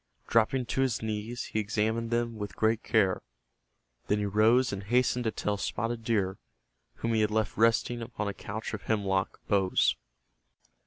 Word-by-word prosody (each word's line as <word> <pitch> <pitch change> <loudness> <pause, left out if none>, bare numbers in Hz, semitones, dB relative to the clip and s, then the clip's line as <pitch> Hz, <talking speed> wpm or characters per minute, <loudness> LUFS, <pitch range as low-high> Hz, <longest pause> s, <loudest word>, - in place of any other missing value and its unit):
Dropping 120 +3 +2
to 135 - -1
his 125 -4 0
knees 110 +2 -3
he 110 - +1
examined 110 +2 0
them 120 0 0
with 105 -3 -5
great 110 +1 +2
care. 95 -5 +2 0.9
Then 105 - +2
he 105 - -1
rose 110 +4 +3
and 100 0 -5
hastened 125 +2 +2
to 110 - +1
tell 105 -1 -2
Spotted 115 +3 -3
Deer, 100 -5 0 0.6
whom 115 0 -2
he 110 - +3
had 105 - +2
left 110 -1 0
resting 115 +2 +2
upon 115 -2 -4
a 100 - -2
couch 110 +3 -6
of 105 - -4
hemlock 100 -2 0
boughs. 95 -2 +3
110 Hz, 165 wpm, -29 LUFS, 105-115 Hz, 0.9 s, rose